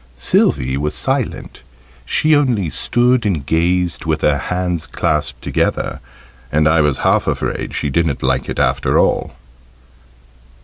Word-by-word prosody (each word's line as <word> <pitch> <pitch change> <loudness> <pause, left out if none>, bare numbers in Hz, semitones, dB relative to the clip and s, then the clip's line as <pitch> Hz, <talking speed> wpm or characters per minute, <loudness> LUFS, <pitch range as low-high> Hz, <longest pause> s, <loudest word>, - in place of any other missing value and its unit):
Sylvie: 65 +1 +1
was 75 +2 -2
silent - - -2 0.5
she 155 - +3
only 120 - +1
stood 120 +1 +2
and 85 -10 -1
gazed 85 +2 0
with 80 -1 -1
her 70 -1 +2
hands 90 -3 -2
clasped 70 -5 -2
together, 65 - -1 0.5
and 75 +1 +3
I 80 0 +4
was 75 -3 +1
half - - +2
afraid - - -3
she 70 - -2
didn't 80 -1 0
like 65 0 0
it - - -4
after - - +1
all. - - +1
80 Hz, 135 wpm, -17 LUFS, 70-90 Hz, 0.5 s, I